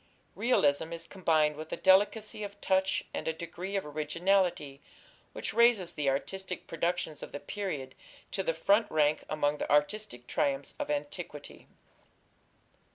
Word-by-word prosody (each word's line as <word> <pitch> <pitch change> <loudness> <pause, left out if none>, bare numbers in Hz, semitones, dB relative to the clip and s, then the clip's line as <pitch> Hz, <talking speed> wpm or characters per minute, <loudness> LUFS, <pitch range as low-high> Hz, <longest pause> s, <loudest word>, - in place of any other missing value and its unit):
Realism 160 - +2
is 165 0 -6
combined 160 -5 +2
with 155 +1 -8
a - - -2
delicacy 205 +3 +3
of 205 0 -7
touch 190 -1 +1
and - - -4
a 160 - +1
degree 170 +4 -6
of 195 - -1
originality 155 0 0 0.5
which - - -4
raises 230 -7 +4
the 145 -3 0
artistic 185 +7 -3
productions 165 -2 -2
of - - -8
the 145 - -5
period 145 -5 -4 0.4
to 195 - -1
the 185 - +1
front 200 +7 +3
rank 150 -1 +2
among 150 -1 0
the - - -3
artistic 150 - +1
triumphs 140 +2 0
of - - -3
antiquity. 150 +1 -5
165 Hz, 145 wpm, -30 LUFS, 150-195 Hz, 0.5 s, raises